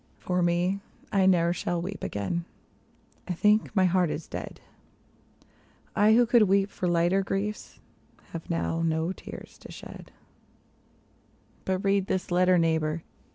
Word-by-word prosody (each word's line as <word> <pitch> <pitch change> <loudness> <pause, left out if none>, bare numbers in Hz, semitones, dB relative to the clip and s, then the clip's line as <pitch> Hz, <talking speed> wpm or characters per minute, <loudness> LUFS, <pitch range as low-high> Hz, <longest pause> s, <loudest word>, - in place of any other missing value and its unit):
For 180 0 -1
me, 175 +3 +1 0.3
I 190 -2 +3
ne'er 170 -2 +4
shall 175 -1 -2
weep 190 +3 -6
again. 135 - -2 0.8
I 180 - -1
think 210 +5 +2
my 190 -2 +4
heart 180 -1 +2
is 155 - -5
dead; - - -7 1.4
I, 215 +1 +5
who 240 +1 +5
could 235 -2 +4
weep 195 +1 +2
for 180 - -3
lighter 175 +3 +2
griefs, 200 +2 -4 0.5
have 165 -1 -7
now 165 -1 -1
no 160 +1 0
tears - - -10
to - - -12
shed - - -11 1.5
But 190 0 -1
read 195 -1 +2
this 185 -1 -2
letter, 180 +1 +4
neighbor. 160 -1 +1
180 Hz, 140 wpm, -27 LUFS, 170-195 Hz, 1.5 s, I